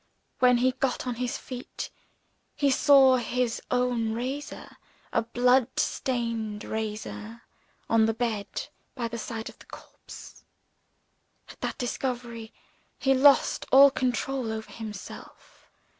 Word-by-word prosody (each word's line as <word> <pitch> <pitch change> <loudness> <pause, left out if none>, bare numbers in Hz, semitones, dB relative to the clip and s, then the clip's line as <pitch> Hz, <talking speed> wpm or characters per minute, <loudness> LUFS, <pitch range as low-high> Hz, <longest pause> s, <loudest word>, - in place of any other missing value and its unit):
When 250 -1 +5
he 255 +2 +3
got 260 0 -2
on 250 - -1
his 250 -1 -1
feet, 250 -1 -7 0.6
he 280 -2 +2
saw 265 -1 +6
his 245 0 -1
own 245 -3 +1
razor 265 +5 -5 0.4
a 230 - +3
blood 245 +2 +2
stained 230 -4 -2
razor 220 +1 -5 0.4
on 225 -1 +4
the 225 - +1
bed 225 -4 -3 0.3
by 240 -3 -2
the 235 0 -6
side 225 -1 -5
of - - -11
the - - -17
corpse. - - -13 1.1
At - - -14
that - - -3
discovery, 240 -2 -4 0.5
he 270 -1 +2
lost 275 +1 +4
all 275 +1 +9
control 255 -1 -1
over 220 0 -6
himself. 215 -4 -10
245 Hz, 125 wpm, -27 LUFS, 225-260 Hz, 1.1 s, all